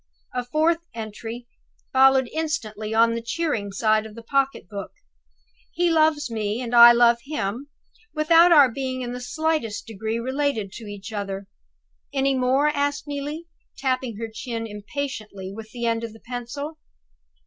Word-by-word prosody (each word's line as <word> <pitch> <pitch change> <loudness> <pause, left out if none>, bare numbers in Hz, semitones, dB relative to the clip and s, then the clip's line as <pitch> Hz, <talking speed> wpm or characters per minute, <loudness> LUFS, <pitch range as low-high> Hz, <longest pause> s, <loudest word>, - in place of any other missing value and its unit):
'" - - -40
A 250 - -1
fourth 315 +6 +2 0.2
entry 225 +2 -6 0.5
followed 265 -1 +5
instantly 220 -10 -3
on 230 +1 +4
the 230 - -3
cheering 230 -5 -2
side 215 +2 +2
of 215 - -14
the 230 - -10
pocket 275 -2 0
book: 200 0 -6 0.8
"He 345 0 +2
loves 310 -2 +3
me, 215 0 -2
and 245 -1 -4
I 235 0 +11
love 235 0 +5
him 275 -2 -3 0.4
without 330 +3 +5
our 290 -5 +8
being 260 +1 -3
in 240 - -4
the 250 - -6
slightest 305 -4 -1
degree 220 +1 -3
related 260 -4 -1
to 225 +2 -9
each 205 +1 -8
other. 195 -1 -4 0.6
Any 275 -1 +1
more?" 265 +3 +3
asked 285 -1 -1
Neelie, 290 +3 -5 0.3
tapping 255 -4 -1
her 225 +1 -4
chin 225 +1 -5
impatiently 210 -3 -6
with 220 +1 -9
the 235 +1 -5
end 230 0 0
of 225 -2 -5
the 225 - -14
pencil. 255 +6 -6
245 Hz, 160 wpm, -24 LUFS, 220-285 Hz, 0.8 s, I